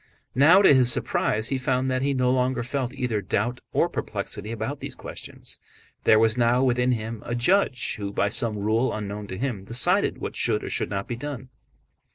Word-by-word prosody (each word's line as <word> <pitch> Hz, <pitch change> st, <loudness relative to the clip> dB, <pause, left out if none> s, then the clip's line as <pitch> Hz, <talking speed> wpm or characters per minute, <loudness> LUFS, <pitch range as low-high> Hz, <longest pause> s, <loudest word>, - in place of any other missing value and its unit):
Now 165 Hz, +9 st, +6 dB
to 170 Hz, -, +7 dB
his 125 Hz, -2 st, +5 dB
surprise 110 Hz, +1 st, 0 dB
he 135 Hz, -, -1 dB
found 130 Hz, 0 st, 0 dB
that 130 Hz, 0 st, 0 dB
he 140 Hz, 0 st, 0 dB
no 125 Hz, -1 st, +2 dB
longer 125 Hz, -1 st, +1 dB
felt 130 Hz, 0 st, -2 dB
either 125 Hz, -6 st, -1 dB
doubt 110 Hz, +6 st, -1 dB
or -, -, +2 dB
perplexity 105 Hz, -, -5 dB
about 115 Hz, +6 st, -4 dB
these -, -, -6 dB
questions. -, -, -7 dB, 0.5 s
There 110 Hz, -, +6 dB
was 110 Hz, +2 st, +3 dB
now 120 Hz, +2 st, +3 dB
within 125 Hz, 0 st, +2 dB
him 110 Hz, -1 st, -4 dB
a 120 Hz, -, -3 dB
judge 130 Hz, -, +1 dB
who 100 Hz, -1 st, -4 dB
by 100 Hz, 0 st, +1 dB
some 115 Hz, -1 st, 0 dB
rule 110 Hz, +5 st, +1 dB
unknown 105 Hz, 0 st, -5 dB
to 95 Hz, -, -6 dB
him 120 Hz, -5 st, -3 dB
decided 115 Hz, +5 st, +1 dB
what -, -, -5 dB
should -, -, 0 dB
or -, -, -5 dB
should -, -, -1 dB
not 100 Hz, -1 st, -3 dB
be 120 Hz, -, -3 dB
done. 130 Hz, -1 st, -6 dB
120 Hz, 200 wpm, -25 LUFS, 110-130 Hz, 0.5 s, to